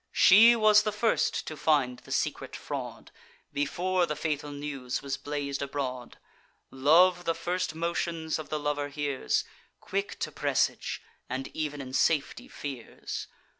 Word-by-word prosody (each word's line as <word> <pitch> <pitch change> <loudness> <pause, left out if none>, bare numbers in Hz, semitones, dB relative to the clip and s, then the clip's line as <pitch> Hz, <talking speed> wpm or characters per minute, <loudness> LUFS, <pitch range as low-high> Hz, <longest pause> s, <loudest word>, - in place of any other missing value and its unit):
She 225 +5 +8
was 215 -2 +6
the 215 - -1
first 215 +2 +1
to 155 - -5
find 140 -5 +1
the - - -14
secret - - -2
fraud, - - -6 0.4
Before 175 +5 0
the 150 - -2
fatal 150 -1 -2
news 140 -3 -4
was 140 -1 -2
blaz'd 145 -1 -4
abroad. 130 -3 -4 0.5
Love 175 +6 +4
the 165 - +1
first 175 0 -2
motions 165 -1 -2
of 155 - -7
the 155 - -1
lover 145 -1 -1
hears, 145 -2 -1 0.4
Quick 195 - -3
to - - -2
presage, - - 0 0.3
and 130 +1 -5
ev'n 150 -2 -3
in 130 -1 -8
safety 160 - +1
fears. 135 - -6
150 Hz, 140 wpm, -29 LUFS, 140-175 Hz, 0.5 s, She